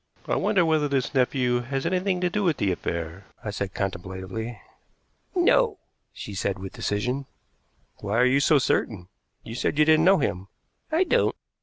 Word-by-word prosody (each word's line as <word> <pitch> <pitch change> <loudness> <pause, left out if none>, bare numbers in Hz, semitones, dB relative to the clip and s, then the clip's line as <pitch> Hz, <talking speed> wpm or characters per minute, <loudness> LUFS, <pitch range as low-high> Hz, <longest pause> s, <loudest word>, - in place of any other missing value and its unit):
"I - - +1
wonder 185 -5 +2
whether 155 -2 +2
this 135 -2 -1
nephew 125 -2 +2
has 135 +2 -3
anything 185 0 0
to 180 - +2
do 210 +2 0
with 170 -6 +2
the 100 - +1
affair?" 85 +1 -4 0.2
I 105 - -3
said 100 -1 -4
contemplatively. 95 +4 -4 0.8
"No," 425 +5 +3 0.3
she 105 - -8
said 100 +1 -1
with 95 0 -8
decision. 125 +7 -2 0.7
"Why 100 +2 -2
are 125 - +5
you 130 +2 +4
so 150 +2 +4
certain? 100 -8 0 0.3
You 115 - -8
said 125 +4 -1
you 150 - +5
didn't 160 0 +5
know 190 +1 +6
him." 95 - -2 0.4
"I 325 +4 +3
don't." - - +2
125 Hz, 170 wpm, -25 LUFS, 100-160 Hz, 0.8 s, know